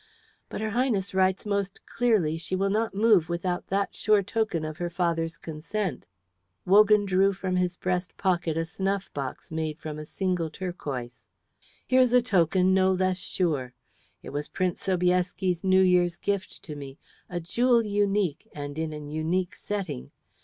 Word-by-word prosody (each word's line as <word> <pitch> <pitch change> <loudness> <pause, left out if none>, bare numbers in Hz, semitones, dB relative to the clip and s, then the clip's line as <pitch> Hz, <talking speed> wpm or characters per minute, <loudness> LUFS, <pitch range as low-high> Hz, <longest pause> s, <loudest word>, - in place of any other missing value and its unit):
"But - - -5
her 220 0 -1
Highness 225 -5 0
writes 190 +1 +2
most 200 -2 -2
clearly 215 -10 +1
she 185 - -3
will 195 +1 +1
not 220 0 0
move 205 -6 +4
without 175 +1 -2
that 200 +1 0
sure 210 -1 +3
token 200 -6 -1
of 155 0 -6
her 175 0 -2
father's 165 -2 -1
consent." 160 - -4 0.6
Wogan 210 +2 +6
drew 195 +1 +3
from 190 -1 -2
his 180 0 0
breast 180 0 -2
pocket 175 -4 0
a 165 - 0
snuff 195 +3 -2
box 140 +4 -5
made 160 -1 -2
from 155 -2 -6
a 155 - -6
single 180 -1 -1
turquoise. 145 -9 -6 0.6
"Here's 255 -1 +4
a 250 - +6
token 185 -3 +3
no 190 0 +4
less 185 0 +1
sure. 150 -9 -1 0.5
It - - -8
was 145 +1 -3
Prince 185 -2 -2
Sobieski's 180 -1 +1
New 190 0 +5
Year's 175 -2 +3
gift 200 -1 -3
to 150 - -7
me, 140 -1 -8 0.3
a 175 - -3
jewel 235 +7 +2
unique 200 -5 0
and 145 +1 -5
in 160 -1 -2
an 150 -1 -7
unique 170 +4 -1
setting. 190 - -4
185 Hz, 160 wpm, -27 LUFS, 160-195 Hz, 0.6 s, Wogan